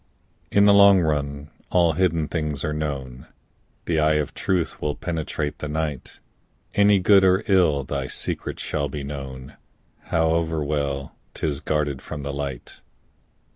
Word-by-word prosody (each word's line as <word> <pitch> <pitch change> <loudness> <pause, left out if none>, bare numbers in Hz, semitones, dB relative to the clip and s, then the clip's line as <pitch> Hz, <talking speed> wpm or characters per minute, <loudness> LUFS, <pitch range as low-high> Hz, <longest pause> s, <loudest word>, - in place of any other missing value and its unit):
In 100 0 +5
the 100 - +7
long 100 -2 +7
run 70 -2 -2 0.2
all 85 -2 +3
hidden 85 -2 +1
things 75 -3 -2
are 75 - -1
known, 70 -5 -5 0.6
The 80 -2 +1
eye 75 0 +3
of 75 -2 -1
truth 90 -3 -1
will 75 -1 -1
penetrate 80 -3 -3
the 75 - -4
night, 75 -2 -4 0.6
And 100 -2 +4
good 100 0 +6
or 95 +2 +4
ill, 85 -8 +3
thy 70 0 -3
secret - - -4
shall 70 -2 -2
be 70 +1 -5
known, 70 -2 -8 0.5
However 80 -1 +1
well 70 -2 -2 0.2
'tis 75 -3 -2
guarded 75 -2 -1
from 75 -2 -7
the 70 0 -4
light. 70 -3 -6
75 Hz, 145 wpm, -23 LUFS, 70-85 Hz, 0.6 s, the